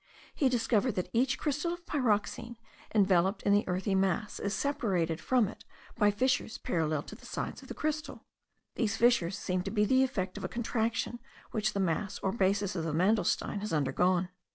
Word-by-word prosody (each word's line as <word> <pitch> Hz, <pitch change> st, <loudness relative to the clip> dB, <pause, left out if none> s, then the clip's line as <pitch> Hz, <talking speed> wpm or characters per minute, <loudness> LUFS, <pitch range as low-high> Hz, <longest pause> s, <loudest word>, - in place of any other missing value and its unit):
He 275 Hz, -, +2 dB
discovered 240 Hz, -1 st, +1 dB
that 180 Hz, -, -3 dB
each 255 Hz, +3 st, +2 dB
crystal 300 Hz, +3 st, -1 dB
of 345 Hz, 0 st, -10 dB
pyroxene, 235 Hz, -2 st, -1 dB, 0.4 s
enveloped 195 Hz, -1 st, +3 dB
in 200 Hz, -, +3 dB
the 205 Hz, -, +4 dB
earthy 185 Hz, +2 st, -1 dB
mass, 190 Hz, +1 st, 0 dB
is 200 Hz, 0 st, -1 dB
separated 185 Hz, -, 0 dB
from 250 Hz, 0 st, +3 dB
it 210 Hz, -, -10 dB, 0.3 s
by 210 Hz, -3 st, +4 dB
fissures 250 Hz, +2 st, 0 dB
parallel 155 Hz, -3 st, -1 dB
to -, -, -10 dB
the 215 Hz, -, -12 dB
sides -, -, -4 dB
of -, -, -13 dB
the -, -, -7 dB
crystal. 310 Hz, 0 st, -3 dB, 0.5 s
These 215 Hz, -4 st, 0 dB
fissures 225 Hz, -6 st, +3 dB
seem 180 Hz, -2 st, -1 dB
to 195 Hz, -, -4 dB
be 210 Hz, 0 st, +2 dB
the 260 Hz, +4 st, +4 dB
effect 190 Hz, -8 st, -1 dB
of -, -, -9 dB
a -, -, -2 dB
contraction 235 Hz, 0 st, -1 dB, 0.3 s
which 215 Hz, -1 st, 0 dB
the 200 Hz, -, -2 dB
mass 190 Hz, +2 st, -1 dB
or 190 Hz, -, +1 dB
basis 200 Hz, -1 st, +1 dB
of 165 Hz, -, -2 dB
the 160 Hz, -2 st, -2 dB
mandelstein 195 Hz, +3 st, +1 dB
has 210 Hz, +1 st, -4 dB
undergone. 175 Hz, +6 st, +2 dB
205 Hz, 185 wpm, -31 LUFS, 185-240 Hz, 0.5 s, the